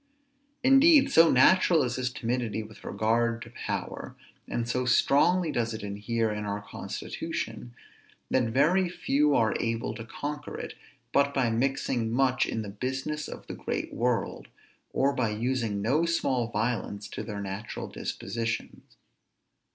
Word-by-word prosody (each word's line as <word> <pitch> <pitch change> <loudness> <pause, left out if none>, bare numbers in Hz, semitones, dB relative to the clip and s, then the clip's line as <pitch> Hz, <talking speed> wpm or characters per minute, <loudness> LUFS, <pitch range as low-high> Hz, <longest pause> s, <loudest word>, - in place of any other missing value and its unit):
_ - - -42 0.6
Indeed 275 +2 +6
so 165 -6 +7
natural 170 +5 +5
is 125 -1 -1
this 125 -1 -1
timidity 115 -3 -2
with 105 -1 -14
regard 115 +3 +1
to - - -13
power, - - -5 0.3
and 120 -1 -2
so 125 +2 0
strongly 160 +7 +3
does 115 -3 -1
it 110 - -7
inhere 105 +3 -1
in 105 0 -3
our 100 0 -2
constitution, - - -5 0.6
that 130 -2 +3
very 160 +11 +3
few 150 -4 +2
are 110 -3 +3
able 115 0 -1
to 115 - -7
conquer 145 +5 -5
it, - - -6 0.4
but 140 0 +3
by 125 -4 +2
mixing 120 -1 0
much 130 +1 +2
in 110 - -2
the 105 - -6
business 130 +8 -3
of - - -9
the - - -6
great - - -4
world, 120 -3 -1 0.4
or 140 +1 +2
by 125 -5 0
using 110 -2 -1
no 150 +9 +2
small 130 -8 +1
violence 110 -2 -2
to - - -5
their 105 -2 -5
natural 100 +2 -5
dispositions. 115 -1 -4
120 Hz, 150 wpm, -28 LUFS, 110-140 Hz, 0.6 s, so